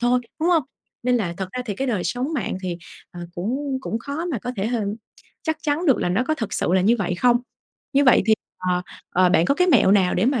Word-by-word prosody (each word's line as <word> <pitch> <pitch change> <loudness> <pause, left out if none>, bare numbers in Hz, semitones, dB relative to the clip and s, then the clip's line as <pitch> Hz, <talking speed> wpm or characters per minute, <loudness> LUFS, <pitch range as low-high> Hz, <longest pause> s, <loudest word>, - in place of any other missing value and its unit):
thôi, 245 +1 +3 0.2
đúng 330 - +2
hông? 330 -4 +4 0.4
Nên 250 0 +2
là 175 -7 -2
thật 190 -1 -4
ra 250 0 -3
thì 205 - -2
cái 270 +6 -2
đời 210 -8 -1
sống 250 - -2
mạng 225 -7 -2
thì, 180 -2 -3 0.3
ờ, 175 -2 -9
cũng 260 +9 -2
cũng 225 - -3
khó 285 +7 -4
mà 320 -9 -2
có 245 - -5
thể 195 - -1
h 240 +1 0 0.7
chắc 315 -1 -1
chắn 310 +3 0
được 270 - +4
là - - 0
nó 210 +8 +1
có 310 - +2
thực 225 -8 -5
sự - - -1
là 190 - +4
như 225 +6 +4
vậy 180 -2 -1
không. 240 +6 +4 0.6
Như 280 +1 +4
vậy 250 - +6
thì, 220 - +6 0.2
ờ, 180 -1 0 0.3
ờ, 185 0 +4
bạn 175 -2 +4
có 280 - +2
cái 360 +3 +2
mẹo 190 - +5
nào 195 -3 +4
để 185 - +2
mà 260 -2 +2
240 Hz, 260 wpm, -23 LUFS, 190-275 Hz, 0.7 s, vậy